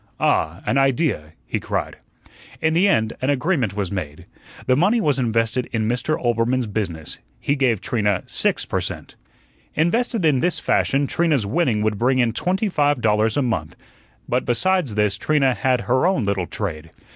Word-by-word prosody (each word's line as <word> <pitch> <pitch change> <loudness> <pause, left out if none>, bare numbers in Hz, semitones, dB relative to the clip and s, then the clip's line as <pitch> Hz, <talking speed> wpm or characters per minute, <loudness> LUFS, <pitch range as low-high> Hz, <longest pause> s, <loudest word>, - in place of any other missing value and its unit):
"Ah, 80 +4 +1
an 135 - +2
idea," 135 - 0
he - - -2
cried. - - -3 0.6
In 160 0 +1
the 180 +5 +4
end 110 - +2
an 130 - 0
agreement 140 - 0
was 100 -4 -2
made. 80 -7 -5 0.4
The 130 - +3
money 195 - +3
was 145 - +1
invested 115 0 0
in 110 -2 -1
Mr. 125 +7 0
Oelbermann's 120 0 0
business. 95 -7 -4 0.2
He 145 - 0
gave 125 -7 +1
Trina 105 -5 0
six - - 0
per - - -2
cent. - - -6 0.6
Invested 220 +5 +1
in 145 -5 +3
this 170 +2 0
fashion, 140 -2 +1
Trina's 150 -6 +1
winning 110 -2 +1
would 105 -2 0
bring 130 +2 +2
in 120 -2 +2
twenty 190 - 0
five 145 -6 +1
dollars 110 0 +1
a 145 - +2
month. 90 -11 -2 0.5
But, 125 +1 0
besides 165 - +1
this, 105 -1 +1
Trina 135 -1 +2
had 130 -1 +1
her 130 - +2
own 165 - +1
little 100 -3 -1
trade. 80 -6 -5
125 Hz, 170 wpm, -21 LUFS, 105-150 Hz, 0.6 s, the